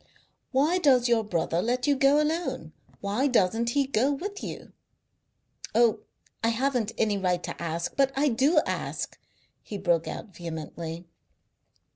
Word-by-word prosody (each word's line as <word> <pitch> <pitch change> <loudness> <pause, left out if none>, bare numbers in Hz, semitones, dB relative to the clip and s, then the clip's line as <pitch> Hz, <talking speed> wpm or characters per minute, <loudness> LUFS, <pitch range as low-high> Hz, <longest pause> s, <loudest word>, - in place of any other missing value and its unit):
"Why 300 +7 +3
does 260 -7 +4
your 235 -2 +3
brother 170 -3 0
let 250 +4 0
you 285 - +3
go 275 +2 +4
alone? 320 +3 -2 0.3
Why 210 +8 +1
doesn't 230 -1 +2
he 280 +3 +2
go 265 +1 +1
with 400 +8 -4
you? - - -7 1.0
Oh, 230 -1 +4 0.4
I - - +3
haven't 240 -2 0
any 210 -2 +1
right 180 -2 0
to - - -6
ask, 170 0 -3
but 275 -1 +3
I 285 +2 +3
do 275 +7 +3
ask," - - -4 0.4
he 205 - -6
broke 170 -3 +1
out 195 -6 -7
vehemently. 165 0 -6
235 Hz, 145 wpm, -27 LUFS, 185-275 Hz, 1.0 s, does